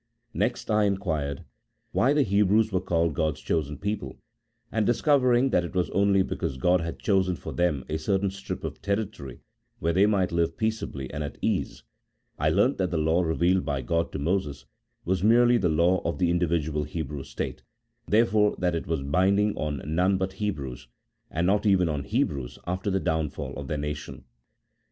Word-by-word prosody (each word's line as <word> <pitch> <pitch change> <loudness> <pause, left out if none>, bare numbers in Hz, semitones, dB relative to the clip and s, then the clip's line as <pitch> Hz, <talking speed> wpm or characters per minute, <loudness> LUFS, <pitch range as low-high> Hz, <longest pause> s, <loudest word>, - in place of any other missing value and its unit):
Next - - -1
I 105 0 +3
inquired, 80 -8 -2 0.5
why 130 - +3
the 145 -1 +3
Hebrews 105 +1 +3
were 95 -1 0
called 85 -3 +1
God's 80 0 -1
chosen 75 -2 -2
people, 100 -10 -4 0.5
and 110 - +1
discovering 125 +1 +3
that 90 - +3
it 85 - -7
was 90 -1 0
only 100 -1 +3
because 80 -7 -3
God 90 +6 +3
had 80 0 -4
chosen 95 -3 +1
for - - -7
them 85 -6 0
a 80 - -2
certain 95 +4 0
strip 100 - -6
of - - -6
territory, 100 - -3 0.4
where 85 +1 0
they 95 +4 +4
might 95 -4 +1
live 85 -1 0
peaceably 110 -12 -3
and 75 - -3
at 70 - -6
ease, - - -2 0.6
I - - +2
learnt - - +2
that 95 -2 +1
the 85 - -1
Law 80 +3 +2
revealed 85 +2 +2
by 70 -3 -2
God 85 +6 0
to - - -2
Moses 75 -3 -2 0.4
was 95 +1 0
merely 120 +2 +5
the 90 - +1
law 85 +4 +3
of 85 - -2
the 90 -2 +2
indi 85 0 +1
vidual 75 -2 -1
Hebrew 75 -3 -4
state, - - -5 0.5
therefore 105 -1 +3
that 90 -1 0
it 85 - -3
was 80 -4 -1
binding 100 +8 +2
on 75 -3 -3
none 90 +5 +2
but 95 0 -2
Hebrews, 70 - -4 0.4
and 85 +2 -1
not 105 +3 +2
even 95 -3 +4
on 75 -3 -2
Hebrews 80 - -1
after 90 +3 -2
the 95 0 +1
downfall 80 -3 -2
of 70 - -6
their 75 - -2
nation. 75 +1 -5
90 Hz, 185 wpm, -26 LUFS, 75-100 Hz, 0.6 s, merely